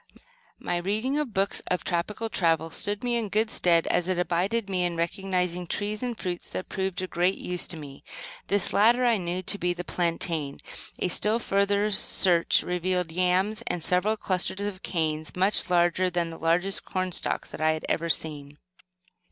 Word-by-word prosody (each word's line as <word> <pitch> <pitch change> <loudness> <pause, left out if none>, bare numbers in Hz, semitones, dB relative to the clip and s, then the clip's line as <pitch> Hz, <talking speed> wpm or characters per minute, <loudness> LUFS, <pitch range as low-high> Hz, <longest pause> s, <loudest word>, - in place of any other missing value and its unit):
My 175 - -2
reading 215 +11 -1
of 295 -6 -2
books 195 0 +1
of 180 - -1
tropical 185 +6 -2
travel 165 -5 +1
stood 205 +6 -3
me 240 -1 0
in 225 -3 -2
good 215 +2 +1
stead 170 -2 +3
as 175 0 0
it 185 -1 0 0.2
aided 200 +5 0
me 185 -2 0
in 175 -1 -1
recognizing 180 0 -1
trees 210 +4 -2
and 245 -2 -3
fruits 180 -4 -4
that 185 - -5
proved 190 -1 -2
of 185 - -6
great 180 +2 +1
use 180 -1 -3
to 170 - -6
me. 140 -3 -10 0.4
This 200 -2 +2
latter, 240 +4 +4
I 235 -2 +4
knew 180 0 -3
to 200 +2 +3
be 180 0 0
the 175 0 -6
plantain. 165 -5 -1 0.4
A - - 0
still 210 +5 +2
further 200 -1 +1
search 180 -3 +3
revealed 180 -1 -1
yams, 185 +5 +1
and 175 - -2
several 190 +6 +2
clusters 190 0 -1
of 205 -2 -4
canes, 155 -2 -2
much 190 +1 +2
larger 175 +1 +3
than 170 -1 -1
the 165 - -9
largest 175 +4 +1
cornstalks 185 -1 -3
that - - -7
I 155 0 +3
had 155 - -5
ever 170 +1 -1
seen. 145 -3 -1
180 Hz, 180 wpm, -27 LUFS, 170-205 Hz, 0.4 s, latter